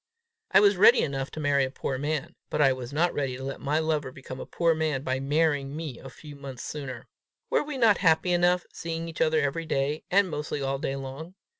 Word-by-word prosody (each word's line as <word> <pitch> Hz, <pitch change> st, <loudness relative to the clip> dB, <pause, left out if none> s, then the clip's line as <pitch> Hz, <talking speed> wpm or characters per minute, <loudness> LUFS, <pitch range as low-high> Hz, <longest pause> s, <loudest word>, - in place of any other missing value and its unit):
I 195 Hz, -, +6 dB
was 200 Hz, -2 st, +5 dB
ready 225 Hz, +6 st, +7 dB
enough 135 Hz, -1 st, -2 dB
to -, -, -8 dB
marry 145 Hz, -2 st, +2 dB
a 130 Hz, -, -1 dB
poor 130 Hz, 0 st, -4 dB
man, 150 Hz, 0 st, -2 dB, 0.2 s
but -, -, -2 dB
I 135 Hz, -3 st, +5 dB
was 130 Hz, -1 st, -7 dB
not 165 Hz, +4 st, +1 dB
ready 135 Hz, -3 st, -2 dB
to 130 Hz, -, -8 dB
let 135 Hz, 0 st, -5 dB
my 145 Hz, +2 st, 0 dB
lover 155 Hz, -4 st, 0 dB
become 130 Hz, 0 st, -9 dB
a -, -, -7 dB
poor 170 Hz, -1 st, +2 dB
man 155 Hz, -4 st, -1 dB
by 130 Hz, -1 st, -1 dB
marrying 145 Hz, 0 st, +1 dB
me 155 Hz, -6 st, -6 dB
a 135 Hz, -, -10 dB
few 145 Hz, +2 st, -12 dB
months 135 Hz, -3 st, -8 dB
sooner. 130 Hz, -5 st, -6 dB, 0.4 s
Were -, -, +3 dB
we 295 Hz, -2 st, -5 dB
not 225 Hz, -5 st, +4 dB
happy 170 Hz, 0 st, +3 dB
enough, 175 Hz, 0 st, +3 dB
seeing 165 Hz, 0 st, -4 dB
each 165 Hz, -, -6 dB
other 155 Hz, 0 st, +3 dB
everyday, 145 Hz, 0 st, -1 dB
and 195 Hz, +1 st, +4 dB
mostly 150 Hz, -3 st, -4 dB
all 135 Hz, 0 st, -1 dB
day 135 Hz, -2 st, -2 dB
long? 135 Hz, +6 st, -7 dB
150 Hz, 225 wpm, -27 LUFS, 135-165 Hz, 0.4 s, ready